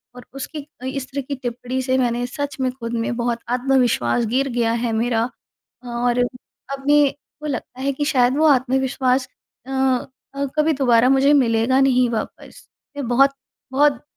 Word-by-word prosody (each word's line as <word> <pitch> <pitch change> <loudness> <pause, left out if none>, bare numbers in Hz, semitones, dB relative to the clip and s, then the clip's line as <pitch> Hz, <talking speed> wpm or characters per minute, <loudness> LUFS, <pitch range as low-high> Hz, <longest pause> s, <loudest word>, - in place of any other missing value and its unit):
और 250 - -11
उसकी 285 +2 -7 0.2
इस 265 -1 -4
तरह 280 +1 -2
की 280 +2 -5
टिप्पणी 250 0 -4
से 260 0 +1
मैंने 245 -1 0
सच 285 +2 -5
में 255 -1 +1
खुद 235 -2 -7
में - - -2
बहुत 235 -1 -1
आत्मविश्वास 245 - +2
गिर 260 +5 0
गया 235 -2 0
है, 235 0 -1
मेरा 230 +1 0 0.6
और 240 0 0 0.5
अभी 290 +2 +3 0.4
वो 300 - -3
लगता 255 -1 -5
है 275 +1 +1
कि 290 +2 -2
शायद 255 0 +3
वो 315 - +3
आत्मविश्वास 260 -1 +2 0.4
अ 270 - -7 0.6
अ, 280 0 -1
कभी 310 +1 +3
दोबारा 250 -2 +4
मुझे 270 +2 +4
मिलेगा 245 -1 +3
नहीं 255 -2 +3
वापस। 220 - -6 0.3
मैं 275 - -3
बहुत, 265 +3 +5 0.4
बहुत 280 -2 +2
255 Hz, 160 wpm, -21 LUFS, 240-275 Hz, 0.6 s, बहुत